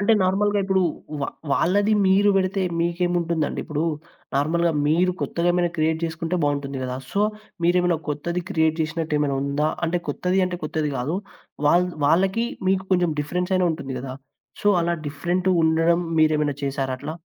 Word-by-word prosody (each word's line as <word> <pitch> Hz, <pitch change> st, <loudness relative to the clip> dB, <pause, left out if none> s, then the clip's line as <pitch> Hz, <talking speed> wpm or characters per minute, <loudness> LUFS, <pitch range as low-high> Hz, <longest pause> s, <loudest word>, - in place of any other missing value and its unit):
అంటే 205 Hz, +3 st, +3 dB
నార్మల్‌గా 205 Hz, +2 st, +2 dB
ఇప్పుడు. 190 Hz, -1 st, +2 dB, 0.4 s
వ 140 Hz, -, 0 dB, 0.3 s
వాళ్ళది 200 Hz, +8 st, +2 dB
మీరు 200 Hz, +2 st, +4 dB
బెడితే 190 Hz, 0 st, +1 dB, 0.2 s
మీకేముంటుందండి? 170 Hz, -2 st, 0 dB
ఇప్పుడు, 150 Hz, +1 st, -2 dB, 0.5 s
నార్మల్‌గా 165 Hz, +4 st, +2 dB
మీరు 175 Hz, +4 st, +3 dB
కొత్తగేమైనా, 175 Hz, 0 st, +1 dB
క్రియేట్ 160 Hz, +1 st, 0 dB
జేసుకుంటే 165 Hz, +2 st, -2 dB
బావుంటుంది 140 Hz, -1 st, -1 dB
గదా! 125 Hz, 0 st, -3 dB, 0.2 s
సో, 200 Hz, -, +1 dB, 0.4 s
మీరేమైనా 175 Hz, -1 st, +3 dB
కొత్తది 170 Hz, +4 st, -2 dB
క్రియేట్ 160 Hz, -3 st, +1 dB
జేసినట్టేమైనా 155 Hz, -3 st, 0 dB
ఉందా? 140 Hz, +2 st, 0 dB, 0.2 s
అంటే 175 Hz, +2 st, 0 dB
కొత్తదీ 180 Hz, +6 st, 0 dB
అంటే, 180 Hz, -1 st, -4 dB
కొత్తది 155 Hz, -1 st, -1 dB
గాదు. 140 Hz, +8 st, -2 dB, 0.5 s
వాళ్ 175 Hz, +4 st, +4 dB, 0.2 s
వాళ్ళకి, 190 Hz, +8 st, +2 dB, 0.2 s
మీకు 190 Hz, 0 st, +1 dB
కొంచం 175 Hz, -3 st, +2 dB
డిఫరెన్సయినా 180 Hz, +4 st, 0 dB
ఉంటుంది 140 Hz, -4 st, -6 dB
గదా! 130 Hz, 0 st, -6 dB, 0.5 s
సో, 205 Hz, -, +3 dB
అలా 170 Hz, +1 st, +1 dB
డిఫరెంటుండడం 170 Hz, +1 st, +2 dB, 0.2 s
మీరేమైనా 150 Hz, -2 st, +2 dB
చేసారట్లా? 135 Hz, +2 st, -3 dB
170 Hz, 135 wpm, -23 LUFS, 150-180 Hz, 0.5 s, మీరు